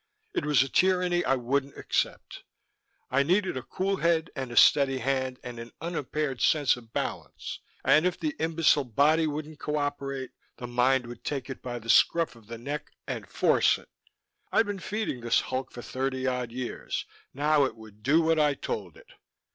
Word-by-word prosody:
It - - -1
was 145 -3 +5
a - - -4
tyranny 180 +2 +2
I 135 - +3
wouldn't 135 +3 -1
accept. - - -2 0.7
I 135 +2 +4
needed 185 +5 +1
a 130 - -3
cool 190 +9 -2
head 165 -2 +1
and 130 -3 -4
a 120 - -6
steady 135 -2 +6
hand 130 0 -1
and 120 -1 -7
an 115 0 -8
unimpaired 150 -4 -3
sense 145 -4 +4
of 115 -2 -14
balance; - - -4 0.3
and 155 - +5
if 180 - -2
the 310 -1 -2
imbecile 160 -3 +3
body 150 +6 +3
wouldn't 150 0 -5
cooperate 145 -3 -2 0.3
the 125 - -6
mind 125 +1 +2
would 120 0 -10
take 135 -2 -3
it - - -8
by 120 -1 -4
the 115 -1 -10
scruff 165 +3 +4
of 115 -3 -18
the 115 0 -7
neck 145 +6 -5 0.2
and - - -5
force - - +3
it. - - -18 0.6
I'd 225 - +4
been 205 -2 -4
feeding 205 - -3
this 120 0 +3
hulk 130 0 -3
for 120 - -9
thirty 130 0 -2
odd 125 -2 -1
years; 125 0 -4 0.3
now 145 +1 +3
it - - -4
would 110 -2 -15
do 150 +8 +4
what 160 0 +3
I 150 -2 +3
told 95 - -5
it. - - -18
135 Hz, 185 wpm, -28 LUFS, 125-155 Hz, 0.7 s, steady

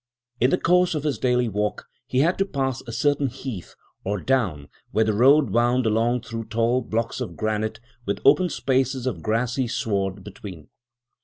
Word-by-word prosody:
In 125 - +4
the - - +2
course 180 0 +3
of 150 - -2
his 150 -2 -1
daily 125 -1 +2
walk 105 0 -2 0.2
he 130 - +1
had 170 +6 +1
to 195 - +3
pass 135 -6 -2
a - - -5
certain 145 +4 +1
heath 125 -7 -7 0.3
or 100 +1 -2
down 95 - 0 0.2
where 110 - +2
the 110 - +1
road 135 +2 +5
wound 120 +3 +2
along 115 +3 +1
through 115 0 -6
tall 115 +3 +1
blocks 115 +2 -2
of 125 - -5
granite 110 0 -2 0.3
with 100 - -1
open 180 +6 +5
spaces 130 0 0
of 130 - -2
grassy 120 +3 0
sward 100 -4 -2
between. 95 -6 -10
120 Hz, 175 wpm, -24 LUFS, 110-135 Hz, 0.3 s, road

